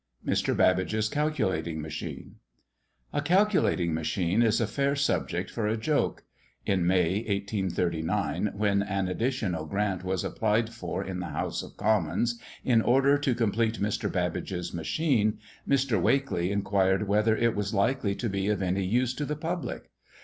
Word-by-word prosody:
MR. - - +1
BABBAGE'S 100 +4 +2
CALCULATING 130 - -1
MACHINE. 75 0 -7 0.8
A - - +1
calculating 175 - +2
machine 85 +5 0
is 115 -2 +3
a 115 - +2
fair 140 +6 0
subject 95 -10 -1
for 110 -3 -1
a 110 +2 0
joke. 145 +6 0 0.4
In 90 -3 +1
May, 90 0 +3
1839, 100 -2 -1
when 100 -1 +2
an 100 -1 -1
additional 90 -6 -1
grant 100 -1 -1
was 95 0 -1
applied 110 +1 0
for 115 -4 -4
in 95 -1 -5
the 90 - -4
House - - -3
of - - -12
Commons, 115 +2 +1 0.3
in 115 -3 +4
order 135 +4 +4
to 135 -4 +1
complete 115 0 0
Mr. 105 +1 -1
Babbage's 90 0 -2
machine, 110 - +1 0.3
Mr. 130 -7 +2
Wakley 115 -5 +1
inquired 100 0 +1
whether 105 +2 +3
it 115 -1 +2
was 100 -1 -2
likely 110 -1 +1
to 120 - -3
be 100 -1 -1
of 105 -2 0
any 95 +1 0
use 120 +6 +1
to 145 +3 -3
the 150 - -2
public? 165 +3 -4
105 Hz, 150 wpm, -28 LUFS, 95-120 Hz, 0.8 s, in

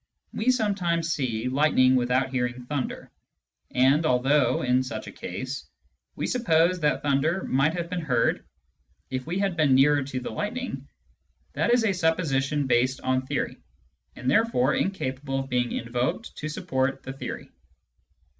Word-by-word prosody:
We 220 +4 0
sometimes 180 -9 +1
see 120 -4 -2
lightning 130 -1 +4
without 130 +1 +1
hearing 125 -1 -2
thunder; 140 -1 -4 0.6
and 135 +5 +3
although, 130 -1 +2
in 125 0 +3
such 115 -4 -5
a 100 - -8
case, 130 +10 -6 0.5
wc - - -1
suppose 180 -7 +2
that 150 -2 +1
thunder 150 +6 +1
might 140 +5 +1
have 170 -1 -3
been 180 0 -3
heard 125 -7 +1 0.7
if 130 +2 -3
we 175 +3 -2
had 195 -2 0
been 150 -5 +4
nearer 145 +2 +5
to 130 -1 -4
the 125 - -6
lightning, 250 +5 -4 0.7
that - - +1
is 240 -1 +4
a 200 - +2
supposition 150 -5 0
based 130 +1 +2
on 130 0 +1
theory, - - -2 0.6
and 125 - -7
therefore 150 - +3
incapable 135 -7 -2
of 135 - -8
being 125 -1 0
invoked 120 - -2
to 155 - -4
support 130 -2 -1
the 135 - -6
theory. 135 - -7
135 Hz, 150 wpm, -26 LUFS, 130-165 Hz, 0.7 s, nearer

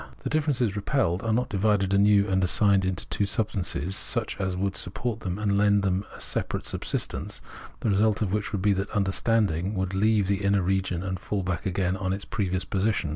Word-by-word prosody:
The - - -3
differences 140 -9 +1
repelled 100 - 0
are 115 - -1
not 125 +3 +1
divided 100 -1 +1
anew 100 0 +4
and 95 -1 +1
assigned 100 +2 +4 0.2
to - - -3
two 100 - 0
substances 95 -5 -1
such 115 +1 -1
as 95 -1 -1
would 100 +1 -1
support 115 +5 -3
them 95 -3 -4
and 100 -1 +1
lend 100 -1 +3
them 95 +1 0
a - - -11
separate - - -3
subsistence, - - -2 0.4
the - - 0
result 105 +2 +2
of 95 -2 -2
which 105 -2 -1
would 100 -3 -2
be 105 -1 +4
that 100 +1 -2
understandiag 100 -2 +1
would 95 0 -2
leave 105 +1 +3
the 100 0 0
iuner 100 -2 +1
region, 95 -2 0
and 95 -1 -3
fall 100 +2 -3
back 90 +3 -2
again 95 0 0
on 95 -1 -2
its 100 +1 -5
previous 95 -3 -2
position. 100 -4 0
100 Hz, 200 wpm, -26 LUFS, 95-105 Hz, 0.4 s, anew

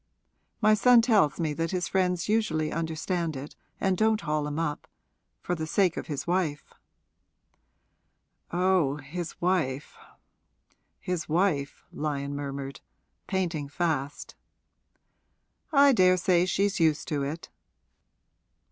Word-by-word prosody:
My 215 0 +5
son 235 +3 +6
tells 210 - +3
me 160 -3 0
that 165 +2 -2
his 180 -2 -1
friends 180 -2 0
usually 180 -9 0
understand 165 0 -2
it 135 +2 -8 0.2
and 190 -1 +1
don't 220 +2 +2
haul 150 -2 -1
him 150 0 -4
up 160 -3 -3 0.6
for 175 - -1
the 160 -2 -3
sake 180 +1 +2
of - - -5
his 145 -3 -4
wife.' 170 -5 -1 1.8
'Oh, 180 -5 +2
his 155 +4 -7
wife 165 -7 -1 1.0
his 180 -3 -4
wife!' 160 -4 0
Lyon 145 -2 -3
murmured, 140 -1 -5 0.5
painting 170 -7 -2
fast. 145 -3 -2 1.4
'I 280 -1 +6
daresay 185 -3 +4
she's 200 +1 0
used 160 -2 +2
to 145 -2 -1
it.' 150 +4 -5
165 Hz, 115 wpm, -27 LUFS, 150-185 Hz, 1.8 s, son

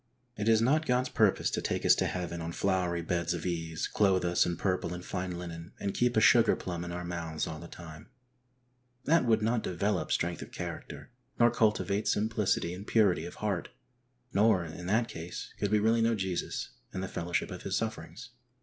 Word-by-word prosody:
It 105 +2 0
is 110 0 +5
not 155 +6 +2
God's 125 +1 +2
purpose 105 -4 +2
to - - -1
take - - -2
us - - +8
to - - +1
heaven 85 -1 -4
on 85 +1 -4
flowery 90 -3 0
beds 85 0 0
of 85 - -6
ease, 80 -2 -2
clothe 95 -3 +2
us 85 0 +3
in 85 -1 -2
purple 90 -2 -1
and 90 - -8
fine 90 -1 -3
linen, 85 -1 -8
and 100 - -2
keep 120 -1 +1
a - - +8
sugar 115 +1 +6
plum 85 -2 -5
in 90 - -5
our 90 0 -4
mouths 85 -2 -3
ail 80 -1 -6
the 85 - -9
time; 80 +2 -11 1.0
that 165 -2 +4
would 110 -2 +3
not 115 +1 +1
develop 95 +1 -1
strength 85 0 0
of - - -9
character, - - -7 0.3
nor 120 -1 +6
cultivate 105 -1 +1
simplicity 105 -5 +1
and 95 +3 -8
purity 95 -7 +3
of - - -10
heart; 100 -5 -2 0.6
nor 100 -4 +4
in 85 +2 -7
that 115 +4 +2
case 85 -2 -7
could 105 - 0
we 105 - +3
really 110 +2 +3
know 115 0 +3
Jesus, 95 -3 -3 0.2
and 95 - -4
the - - -2
fellowship 85 +2 -2
of 90 - -6
His 95 +1 -1
sufferings. 115 +2 -5
95 Hz, 200 wpm, -30 LUFS, 85-110 Hz, 1.0 s, us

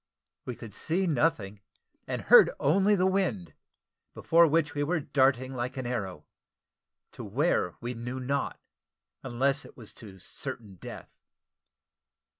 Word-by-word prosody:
We 125 - -5
could 115 -4 -10
see 175 - -1
nothing, 120 - 0 0.5
and - - -3
heard - - +8
only 195 +8 +3
the 185 -1 +2
wind, 185 - 0 0.6
before 170 +1 +4
which 155 0 +1
we 145 - -2
were 165 +3 0
darting 130 -2 +1
like 125 +1 -4
an 130 - -4
arrow 95 -10 -4 0.9
to - - -9
where 110 - 0
we 120 +1 -4
knew 120 +2 -5
not, 140 +2 -2 0.6
unless 135 +3 0
it - - -15
was 115 -4 -10
to 100 -4 -11
certain 100 +1 -8
death. - - -10
130 Hz, 135 wpm, -28 LUFS, 115-160 Hz, 0.9 s, heard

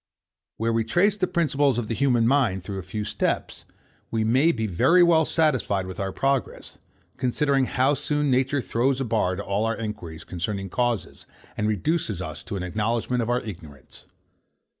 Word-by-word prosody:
Where 115 +1 0
we 115 0 +1
trace 180 - +2
the 190 -3 0
principles 145 -6 +1
of 120 -3 -2
the 115 - -2
human 120 -2 +2
mind 120 -9 +2
through 95 +1 -5
a - - -4
few 105 +4 -5
steps, - - -2 0.4
we 110 -1 0
may 130 +9 +4
be 110 -7 -2
very 165 - +4
well 165 -2 +4
satisfied 130 - +1
with 95 -2 -8
our 95 -1 -2
progress; 135 +5 -2 0.4
considering 135 +1 +1
how 130 +3 +2
soon 145 0 0
nature 130 +2 +1
throws 125 +3 0
a 135 - -1
bar 110 -5 0
to 100 - -5
all 100 +2 0
our 115 0 0
enquiries 105 -8 -6
concerning 95 +2 -4
causes, 120 -9 -2 0.3
and 105 - -1
reduces 110 - -1
us 95 - -6
to - - -5
an 95 - -3
acknowledgment 115 +6 -1
of 115 - -2
our 125 +1 +1
ignorance. 80 - -11
115 Hz, 180 wpm, -25 LUFS, 100-135 Hz, 0.4 s, may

